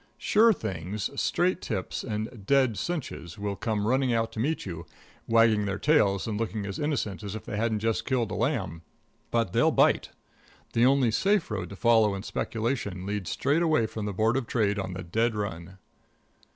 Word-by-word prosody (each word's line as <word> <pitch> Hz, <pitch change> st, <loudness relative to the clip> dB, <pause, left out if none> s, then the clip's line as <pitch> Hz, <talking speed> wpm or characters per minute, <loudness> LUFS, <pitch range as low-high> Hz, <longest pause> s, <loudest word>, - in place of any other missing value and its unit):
Sure 225 Hz, +2 st, +4 dB
Things, 100 Hz, -, -3 dB
Straight 180 Hz, +1 st, +1 dB
Tips 95 Hz, -5 st, -3 dB
and 110 Hz, -1 st, -5 dB
Dead 135 Hz, -5 st, +3 dB
Cinches 100 Hz, -, -4 dB
will 100 Hz, -1 st, -3 dB
come 105 Hz, -1 st, -1 dB
running 130 Hz, +2 st, +2 dB
out 115 Hz, -1 st, 0 dB
to -, -, -7 dB
meet 150 Hz, +8 st, -1 dB
you, 85 Hz, -3 st, -6 dB, 0.4 s
wagging 115 Hz, -2 st, +4 dB
their 100 Hz, -1 st, -2 dB
tails 100 Hz, -7 st, +3 dB
and 105 Hz, -2 st, -3 dB
looking 110 Hz, -2 st, -2 dB
as 100 Hz, -1 st, -5 dB
innocent 135 Hz, -10 st, -2 dB
as 100 Hz, 0 st, -5 dB
if 110 Hz, -, -7 dB
they -, -, -5 dB
hadn't 110 Hz, 0 st, 0 dB
just 115 Hz, 0 st, 0 dB
killed 120 Hz, -5 st, 0 dB
a -, -, -3 dB
lamb, 100 Hz, -, -1 dB, 0.5 s
but 115 Hz, -6 st, 0 dB
they'll -, -, +4 dB
bite. -, -, +3 dB, 0.6 s
The 120 Hz, +2 st, +4 dB
only 135 Hz, -3 st, +3 dB
safe 195 Hz, -, +1 dB
road 95 Hz, -5 st, -3 dB
to 100 Hz, -, -8 dB
follow 110 Hz, -2 st, +4 dB
in 95 Hz, -, -6 dB
speculation 110 Hz, -6 st, -3 dB
leads 100 Hz, -2 st, -3 dB
straight 150 Hz, +4 st, +1 dB
away 155 Hz, -9 st, +3 dB
from 110 Hz, -1 st, -5 dB
the 100 Hz, -, -3 dB
Board 110 Hz, +5 st, +2 dB
of 130 Hz, -4 st, -2 dB
Trade 105 Hz, -4 st, +1 dB
on 95 Hz, -1 st, -4 dB
the 90 Hz, 0 st, -6 dB
dead 110 Hz, +6 st, 0 dB
run. 95 Hz, -3 st, -5 dB
110 Hz, 190 wpm, -27 LUFS, 100-125 Hz, 0.6 s, Sure